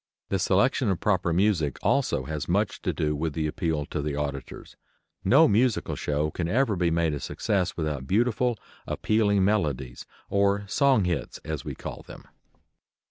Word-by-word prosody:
The 95 - 0
selection 110 +7 +2
of 95 - 0
proper 95 -4 +1
music 85 -6 +1
also 120 - +1
has 75 +1 -5
much 100 +3 0
to - - 0
do 75 -1 -1
with 80 +1 -2
the 80 0 -1
appeal 80 -3 -1
to 75 - -4
the 75 0 -2
auditors. 70 -2 -5 0.5
No 140 +11 +6
musical 115 +3 +1
show 75 +1 -1
can 85 +1 -3
ever 115 +3 +2
be 85 -1 +1
made 80 -1 +1
a 70 - -3
success 90 +6 -1
without 75 -5 -3
beautiful, 120 +3 +1 0.3
appealing 105 -3 +2
melodies, 70 -12 -1 0.2
or 100 0 +1
"song 135 -1 +3
hits," 90 -4 -2
as - - -4
we - - -6
call - - -7
them. - - -12
90 Hz, 165 wpm, -26 LUFS, 75-105 Hz, 0.5 s, No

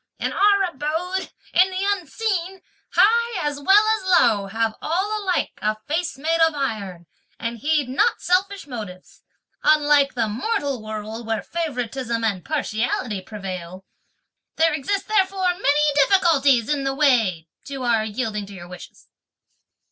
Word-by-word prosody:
In - - -2
our 400 0 +4
abode, 345 +3 -3 0.2
in 370 +2 +5
the 375 +1 -3
unseen, 380 0 -3 0.3
high 465 -5 +3
as 290 -1 -3
well 390 +8 +5
as 375 -4 +3
low, 210 -4 +2
have 225 +2 -1
all 405 +6 -1
alike 370 -2 0
a 215 0 0
face 330 -1 -2
made 325 +4 0
of 325 -1 +4
iron, 200 -10 -4 0.3
and 230 0 -4
heed 295 +1 +1
not 260 +2 +1
selfish 385 +2 0
motives; 210 -9 -9 0.4
unlike 295 -2 +4
the 230 -2 0
mortal 270 - -2
world, 215 +1 -6
where 225 -1 -1
favouritism 250 -7 -3
and 200 -5 -1
partiality 235 -7 -2
prevail. 185 -2 -7 0.7
There 325 0 +3
exist 315 +8 -2
therefore 385 -3 +2
many 300 -4 +2
difficulties 280 - +4
in 290 -2 0
the 270 0 -1
way 225 - +2 0.2
(to 270 -2 -6
our 230 -3 +2
yielding 215 -2 -3
to 200 - -11
your 175 -2 -10
wishes)." 180 0 -12
280 Hz, 140 wpm, -22 LUFS, 220-360 Hz, 0.7 s, in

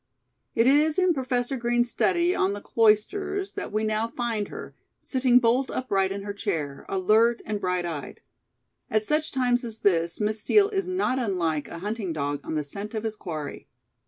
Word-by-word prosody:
It 230 - +4
is 300 +4 +4
in 365 -2 +4
Professor 255 -2 -1
Green's 240 0 +1
study 345 +1 +2
on 195 - +1
the 205 - -5
Cloisters 380 - +1
that 405 - -5
we 215 +1 0
now 215 +1 0
find 230 -3 -2
her, - - -9 0.3
sitting 255 -2 +3
bolt 250 +2 +3
upright 195 -7 0
in 200 0 -4
her 205 0 -4
chair, 160 -10 -3
alert 220 +5 +3
and 210 -1 -3
bright 180 -1 0
eyed. 155 -5 -6 0.7
At 215 0 +1
such 305 +6 0
times 250 -1 +1
as 225 -2 -7
this, 170 -3 +2
Miss 215 +1 0
Steel 405 - +4
is 390 -3 -2
not 370 -8 0
unlike 170 - -1
a - - -8
hunting 210 -5 -3
dog 145 -1 -2
on - - -4
the 150 - 0
scent 200 +10 -5
of 215 - -3
his 220 -1 -3
quarry. 155 -7 -6
220 Hz, 185 wpm, -26 LUFS, 195-255 Hz, 0.7 s, It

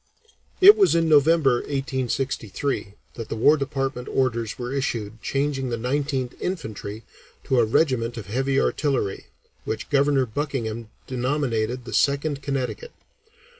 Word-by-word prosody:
It 405 +3 +10
was 395 - +4
in 165 -1 +2
November, 150 -3 +4
1863, 130 -5 -2 0.2
that 115 -2 -7
the - - -3
War 145 +7 +5
Department 135 -3 -3
orders 115 -4 -1
were 125 +1 -4
issued 115 -5 -3
changing 135 -2 -1
the 120 - -2
Nineteenth 130 +1 -1
Infantry 110 - -5 0.4
to 130 - +1
a 115 - +4
regiment 120 -1 +1
of 110 - -6
heavy 135 +6 0
artillery, 135 -9 -1 0.4
which 110 - -5
Governor 140 -1 +3
Buckingham 115 -3 -4 0.2
denominated 125 -2 -1
the - - -7
Second 140 0 +1
Connecticut. 140 - -3
130 Hz, 130 wpm, -24 LUFS, 115-140 Hz, 0.4 s, It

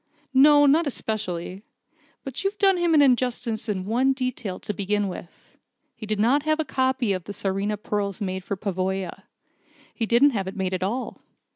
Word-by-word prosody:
"No, 290 +2 +7
not 300 +3 +4
especially. 195 -7 -4 0.6
But 270 +5 -5
you've 395 +1 -1
done 390 -2 +4
him 345 -2 +2
an 290 - +6
injustice 245 -4 0
in 190 -3 -2
one 250 +6 +2
detail, 255 -7 -4
to 210 - -4
begin 205 0 -1
with. 180 -2 -10 0.4
He 215 - -9
did 210 -1 -1
not 250 +7 +3
have 310 +1 +1
the 315 - -1
copy 260 -5 0
of 185 -3 -5
the 205 - -6
Tsarina 200 +2 -2
pearls 205 -1 -3
made 190 -2 -3
for 200 - -4
Pavoya. 190 -2 -3 0.7
He 225 - -2
didn't 250 +6 +5
have 195 -6 -2
it 195 - -6
made 190 -1 -1
at 185 - -2
all. 225 +8 -3
215 Hz, 180 wpm, -24 LUFS, 195-265 Hz, 0.7 s, No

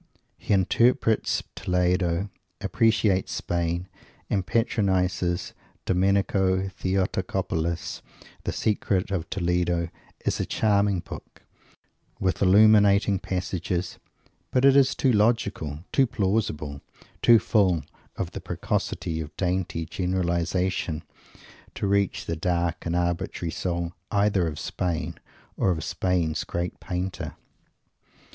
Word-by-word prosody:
He - - -5
interprets 110 +4 +3
Toledo, 90 +1 0 0.3
appreciates 105 -1 +2
Spain, 85 +1 -1 0.4
and 100 -2 +1
patronizes 95 -4 0 0.3
Domenico 95 0 +2
Theotocopoulos. 90 -3 -2 0.4
The - - -1
Secret 100 -3 0
of 85 -4 -2
Toledo 90 -2 0 0.4
is - - 0
a - - 0
charming 100 -3 +2
book, - - -11 0.8
with 95 -1 0
illuminating 100 0 +5
passages, 90 0 -3 0.5
but 130 +1 +2
it 140 0 +7
is 135 -1 +5
too 130 - +2
logical, 100 -8 +1
too 135 -2 +4
plausible, 95 - -1 0.4
too 120 - +7
full 95 -8 +2 0.3
of - - -3
the - - -6
preciosity 80 -1 -2
of 75 -1 -9
dainty 90 -3 -1
generalization, 90 -2 -1 0.7
to - - -2
reach 100 -1 +1
the 85 - -2
dark 85 0 -1
and 85 - -1
arbitrary 85 -1 -1
soul, 85 -1 -2 0.2
either 100 -3 +2
of 75 -2 -4
Spain 85 -1 -3 0.4
or - - +2
of 80 -3 0
Spain's 85 -4 0
great 85 0 -4
painter. 90 +1 -4
90 Hz, 105 wpm, -26 LUFS, 85-100 Hz, 0.8 s, it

